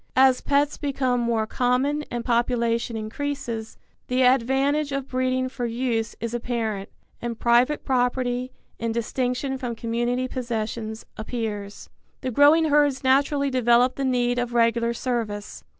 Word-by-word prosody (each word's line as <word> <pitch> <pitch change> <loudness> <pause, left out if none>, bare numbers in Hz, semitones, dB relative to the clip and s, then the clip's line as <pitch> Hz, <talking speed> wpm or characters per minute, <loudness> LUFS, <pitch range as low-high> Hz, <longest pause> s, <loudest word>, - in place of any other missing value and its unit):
As 260 -1 +5
pets 285 +1 +1
become 260 -3 0
more 235 -2 +1
common 255 +6 0
and 240 -1 -4
population 235 -1 0
increases, 230 0 -4 0.3
the 255 +1 +2
advantage 270 +4 +2
of 275 -1 -3
breeding 255 0 0
for 250 -2 -4
use 230 -1 -1
is 230 0 -4
apparent, 230 -4 -2 0.3
and 235 -1 -4
private 240 +6 +2
property, 250 -1 0 0.3
in 230 0 -1
distinction 250 +3 -2
from 245 -3 -3
community 240 +3 -1
possessions, 225 -3 -4
appears. 215 -3 -5 0.3
The 255 - -2
growing 300 +5 +5
herds 290 -2 +3
naturally 280 +1 +2
develop 245 0 +4
the 275 - -4
need 245 -1 +1
of 245 -1 -3
regular 235 0 +2
service. 225 -5 -3
245 Hz, 135 wpm, -24 LUFS, 230-265 Hz, 0.3 s, As